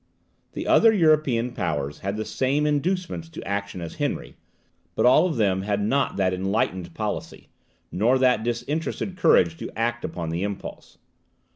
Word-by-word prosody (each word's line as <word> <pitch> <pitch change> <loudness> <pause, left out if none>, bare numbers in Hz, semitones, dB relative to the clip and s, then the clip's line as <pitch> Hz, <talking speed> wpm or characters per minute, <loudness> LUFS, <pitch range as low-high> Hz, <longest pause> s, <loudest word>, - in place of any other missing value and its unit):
The - - -5
other 225 - +6
European 155 - +2
powers 75 -9 -3
had 100 +2 -3
the 110 - -3
same 140 +3 0
inducements 165 +3 -1
to - - -9
action 100 -2 -3
as 85 - -7
Henry, - - -3 0.6
but - - +2
all 150 +8 +6
of 160 - -3
them 95 -4 +2
had 100 +1 -1
not 130 +7 0
that 95 -2 +1
enlightened 95 -1 -1
policy, - - -5 0.4
nor 115 +7 +2
that 125 -4 +3
disinterested 140 - -3
courage 85 - +3
to - - -6
act 120 +1 -1
upon 85 -2 -4
the 85 +2 -2
impulse. 100 0 -6
115 Hz, 155 wpm, -24 LUFS, 95-145 Hz, 0.6 s, other